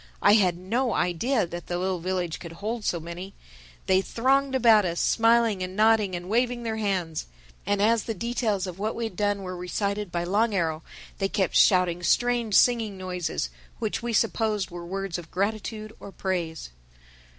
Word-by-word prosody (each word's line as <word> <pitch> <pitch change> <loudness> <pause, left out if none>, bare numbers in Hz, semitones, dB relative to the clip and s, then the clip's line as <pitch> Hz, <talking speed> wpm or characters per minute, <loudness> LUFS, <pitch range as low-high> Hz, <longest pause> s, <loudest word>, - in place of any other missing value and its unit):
I - - +7
had 185 -5 +4
no 230 +8 -1
idea 200 +7 +1
that 175 +1 -8
the 175 - -2
little 185 0 -1
village 180 -1 -2
could 170 -2 -9
hold 215 +6 -4
so 175 - 0
many. 170 +4 -8 0.5
They 190 0 +3
thronged 265 +6 +1
about 225 -4 +6
us, 170 -2 -2
smiling 230 -3 +3
and 185 +1 -4
nodding 215 -3 +3
and 175 0 -6
waving 240 +3 0
their 220 -1 -2
hands; 185 -7 -2 0.4
and 205 0 +1
as 225 0 +3
the 225 - -3
details 220 -2 -1
of 185 0 -7
what 215 +2 -2
we 235 - -3
had 220 -5 -4
done 205 0 0
were 185 -1 -5
recited 200 +2 -3
by 170 0 -1
Long 205 +4 +1
Arrow 160 -3 0 0.4
they 195 - 0
kept 190 -3 0
shouting 180 -2 +4
strange 240 +2 +1
singing 225 -5 +3
noises, 180 - -3 0.3
which 220 -2 -2
we 240 0 -3
supposed 215 -3 0
were 175 0 -7
words 195 -1 -3
of 165 -2 -11
gratitude 215 +2 -3
or 200 - -10
praise. 170 - -3
200 Hz, 180 wpm, -26 LUFS, 180-225 Hz, 0.5 s, I